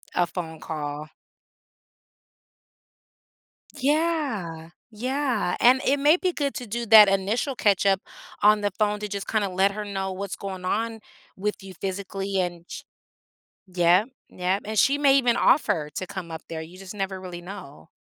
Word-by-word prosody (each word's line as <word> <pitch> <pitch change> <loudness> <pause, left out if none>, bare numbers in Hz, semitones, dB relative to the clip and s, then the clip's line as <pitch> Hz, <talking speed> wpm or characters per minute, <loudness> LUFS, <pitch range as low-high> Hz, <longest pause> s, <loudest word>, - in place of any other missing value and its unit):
A 175 -1 +2
phone 160 -3 -6
call. 150 -1 -5 2.7
Yeah. 265 - -1 0.3
Yeah, 255 -4 -1
and 255 +2 +5
it 280 +2 +3
may 300 +5 +5
be 365 -1 0
good 285 -4 -2
to 250 -5 -6
do 235 +3 -3
that 210 -2 +9
initial 205 +8 0
catch-up 195 -2 +3 0.4
on 210 0 +6
the 205 - +1
phone, 210 -1 +1
to 210 - -4
just 200 -1 -5
kinda 210 -3 0
let 190 +2 +2
her 210 +1 -5
know 195 -2 -3
what's 195 0 -5
going 190 -2 -6
on 225 +3 -1 0.4
with 205 0 -3
you 190 -1 -10
physically 195 +1 -3
and 175 -1 -3
ch - - -8 0.8
yep, 180 +3 +3 0.2
yep, 185 +2 -1
and 215 0 -3
she 280 +1 +4
may 280 -1 +4
even 245 -2 +2
offer 185 - +2
to 185 - -3
come 175 -3 -7
up 160 0 -7
there, 160 -1 -5
you 175 +3 -12
just 195 +1 -9
never 195 -1 -3
really 180 -2 -7
know. 175 - -10
195 Hz, 160 wpm, -25 LUFS, 180-225 Hz, 2.7 s, that